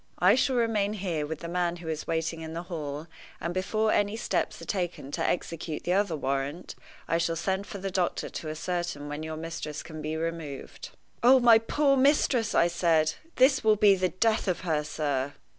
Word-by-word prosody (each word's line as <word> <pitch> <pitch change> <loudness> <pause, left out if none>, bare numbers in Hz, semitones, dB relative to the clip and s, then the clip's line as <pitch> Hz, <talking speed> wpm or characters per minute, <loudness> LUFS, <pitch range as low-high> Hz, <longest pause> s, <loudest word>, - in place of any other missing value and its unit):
I 185 +3 +5
shall 260 +1 +2
remain 215 -4 +1
here 175 -7 -2
with 160 0 -5
the 170 - -5
man 175 0 0
who 170 -1 -10
is 155 -1 -4
waiting 160 0 -1
in 160 0 -6
the 170 - -4
hall; 150 -4 -5 0.3
and 170 +1 -3
before 215 +4 0
any 205 +2 +1
steps - - -1
are - - -9
taken 175 -7 -3
to - - -3
execute 165 -2 -2
the 180 - +1
other 195 -3 +1
warrant, 140 +3 -3 0.3
I 165 - +1
shall 170 0 0
send 190 +4 -2
for 200 - -6
the 195 0 -4
doctor 180 -2 -1
to 155 - -6
ascertain 155 -2 -3
when 145 +1 -4
your 160 0 -5
mistress 155 -2 -5
can 155 -2 -8
be 155 +1 -3
removed." 160 -4 -5 0.3
"Oh, 260 +2 +7
my 235 -2 +7
poor 275 +5 +2
mistress!" 260 -4 +3
I - - +5
said, 165 -2 +2 0.2
"this 265 0 +4
will 215 -1 +5
be 205 -1 +6
the 185 -1 +1
death 220 +4 +1
of 185 - 0
her, 160 -4 0
sir." 145 -2 -2
175 Hz, 200 wpm, -28 LUFS, 155-205 Hz, 0.3 s, Oh